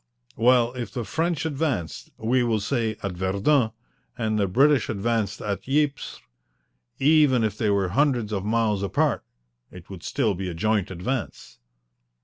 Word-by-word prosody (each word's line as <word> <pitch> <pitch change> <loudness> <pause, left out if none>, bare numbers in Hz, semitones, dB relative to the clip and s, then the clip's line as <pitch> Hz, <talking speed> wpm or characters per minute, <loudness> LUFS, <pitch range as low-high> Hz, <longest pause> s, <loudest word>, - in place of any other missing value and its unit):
"Well, 120 +1 +3
if 125 -2 -5
the 120 - -4
French 165 +2 -1
advanced, 140 - -2
we 125 +3 +1
will 115 -3 +1
say, 110 0 -1
at 100 - -2
Verdun, 100 +8 +1 0.5
and 110 -2 -1
the 100 - +2
British 135 +7 +3
advanced 110 -1 -1
at 105 +4 -4
Ypres, 145 0 0 0.8
even 145 -4 +4
if 105 -2 -1
they 105 -1 0
were 100 -2 +1
hundreds 125 -2 +1
of 95 -2 -2
miles 110 -2 +1
apart 100 - 0 0.5
it 90 +1 -13
would 95 -3 -8
still 105 +4 0
be 95 0 -4
a 85 - -6
joint 105 +2 0
advance." 95 - -5
110 Hz, 150 wpm, -24 LUFS, 100-130 Hz, 0.8 s, even